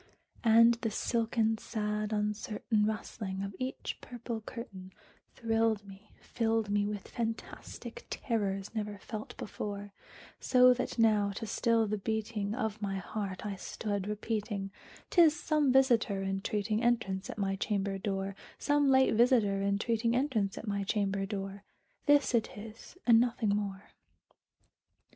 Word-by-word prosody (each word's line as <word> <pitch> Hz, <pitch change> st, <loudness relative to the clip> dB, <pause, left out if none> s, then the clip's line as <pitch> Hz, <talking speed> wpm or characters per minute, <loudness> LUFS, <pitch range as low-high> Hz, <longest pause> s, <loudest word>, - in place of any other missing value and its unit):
And 230 Hz, +1 st, +6 dB
the 225 Hz, -, 0 dB
silken 225 Hz, 0 st, 0 dB
sad 210 Hz, -1 st, -2 dB
uncertain 210 Hz, +1 st, 0 dB
rustling 205 Hz, -3 st, -4 dB
of 200 Hz, 0 st, -5 dB
each 255 Hz, +1 st, -4 dB
purple 235 Hz, -2 st, -6 dB
curtain 195 Hz, -5 st, -8 dB, 0.4 s
Thrilled 225 Hz, -2 st, +1 dB
me 195 Hz, +2 st, -13 dB
filled 225 Hz, -3 st, 0 dB
me 205 Hz, 0 st, +2 dB
with 205 Hz, -2 st, -5 dB
fantastic 230 Hz, -, -6 dB
terrors 200 Hz, -4 st, -2 dB
never 210 Hz, -2 st, -3 dB
felt 215 Hz, +1 st, -7 dB
before; 205 Hz, -1 st, -5 dB, 0.5 s
So 250 Hz, 0 st, +6 dB
that 250 Hz, 0 st, -3 dB
now, 215 Hz, -3 st, +4 dB
to 220 Hz, -, -5 dB
still 230 Hz, +1 st, +2 dB
the 210 Hz, 0 st, -2 dB
beating 215 Hz, 0 st, -2 dB
of 220 Hz, -4 st, -2 dB
my 195 Hz, -1 st, -2 dB
heart, 195 Hz, 0 st, -4 dB
I 205 Hz, -1 st, -3 dB
stood 205 Hz, 0 st, -3 dB
repeating 210 Hz, -2 st, -3 dB, 0.4 s
"'T 350 Hz, -, +6 dB
is 320 Hz, -1 st, +5 dB
some 300 Hz, -4 st, +2 dB
visiter 235 Hz, -7 st, +3 dB
entreating 200 Hz, +2 st, -1 dB
entrance 225 Hz, -6 st, 0 dB
at -, -, -6 dB
my 195 Hz, -1 st, 0 dB
chamber 195 Hz, -1 st, -1 dB
door 195 Hz, 0 st, -2 dB, 0.2 s
Some 290 Hz, -1 st, +2 dB
late 265 Hz, 0 st, +5 dB
visiter 220 Hz, -4 st, +4 dB
entreating 225 Hz, +4 st, +1 dB
entrance 235 Hz, -7 st, 0 dB
at 220 Hz, -, -7 dB
my 200 Hz, -1 st, -1 dB
chamber 195 Hz, -1 st, 0 dB
door; 195 Hz, -1 st, -5 dB, 0.5 s
This 290 Hz, -2 st, +5 dB
it 225 Hz, -2 st, 0 dB
is, 220 Hz, -, -10 dB
and 230 Hz, -2 st, +7 dB
nothing 235 Hz, -2 st, +1 dB
more." 200 Hz, -1 st, -2 dB
215 Hz, 140 wpm, -31 LUFS, 200-230 Hz, 0.5 s, and